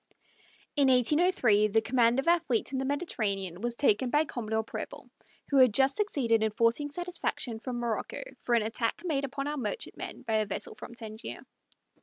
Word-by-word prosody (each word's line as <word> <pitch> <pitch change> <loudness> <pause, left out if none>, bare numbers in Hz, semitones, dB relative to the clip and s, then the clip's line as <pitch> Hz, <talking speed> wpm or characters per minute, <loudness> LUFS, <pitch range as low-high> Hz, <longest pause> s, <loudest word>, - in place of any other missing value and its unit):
In 280 -2 +4
1803 250 - +4
the 220 +2 +3
command 235 +1 +2
of 270 - -1
our 345 +1 +5
fleet 250 -7 -1
in 265 - -1
the 265 - -2
Mediterranean 200 - -2
was 240 0 -2
taken 245 -2 +2
by 300 +4 +3
Commodore 220 -5 -2
Preble, - - -8 0.4
who 280 - +3
had 255 -5 +6
just 270 0 +4
succeeded 265 - +1
in 220 - +2
forcing 230 +7 +1
satisfaction 345 -8 -2
from 245 +1 -5
Morocco 235 - -3 0.2
for 240 - +1
an 230 - +3
attack 225 +7 -2
made 280 -5 0
upon 275 +1 -4
our 295 0 -2
merchantmen 455 - -5
by 220 -1 0
a 215 -1 0
vessel 195 - -5
from 235 - -10
Tangier. 220 -1 -7
245 Hz, 180 wpm, -29 LUFS, 220-280 Hz, 0.4 s, had